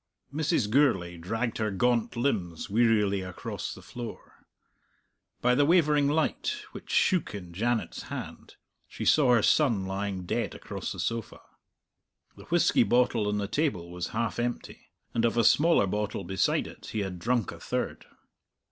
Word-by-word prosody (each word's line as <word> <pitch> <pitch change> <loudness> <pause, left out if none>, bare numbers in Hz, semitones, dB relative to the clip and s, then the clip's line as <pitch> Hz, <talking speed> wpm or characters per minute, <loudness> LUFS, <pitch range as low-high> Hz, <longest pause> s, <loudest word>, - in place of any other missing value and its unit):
Mrs. 155 -6 +1
Gourlay 105 -9 +2
dragged 115 +8 -3
her 110 -1 0
gaunt 120 +4 +1
limbs 100 - -2
wearily 105 -3 +3
across 90 -1 -5
the - - -13
floor. 120 -2 -9 0.9
By 125 0 +4
the 145 - +4
wavering 150 -3 +4
light, 160 - 0
which - - -11
shook 180 - +2
in 90 -4 -8
Janet's 115 +5 -1
hand, - - -7 0.3
she - - -6
saw 130 -5 +5
her 110 - +2
son 115 -11 +3
lying 95 -1 -3
dead - - -2
across - - -6
the - - -6
sofa. 115 -1 -3 0.9
The - - -13
whisky - - +3
bottle 120 -3 +2
on 105 0 0
the 100 -1 -2
table 110 - -1
was 90 -1 -4
half 115 +1 -2
empty, 120 0 -4 0.3
and 115 - 0
of 115 0 +1
a 115 - +4
smaller 155 0 +5
bottle 105 0 -2
beside 95 0 +1
it - - -11
he 110 - 0
had 95 -3 -4
drunk 115 +1 0
a - - -10
third. - - -3
115 Hz, 155 wpm, -28 LUFS, 100-125 Hz, 0.9 s, saw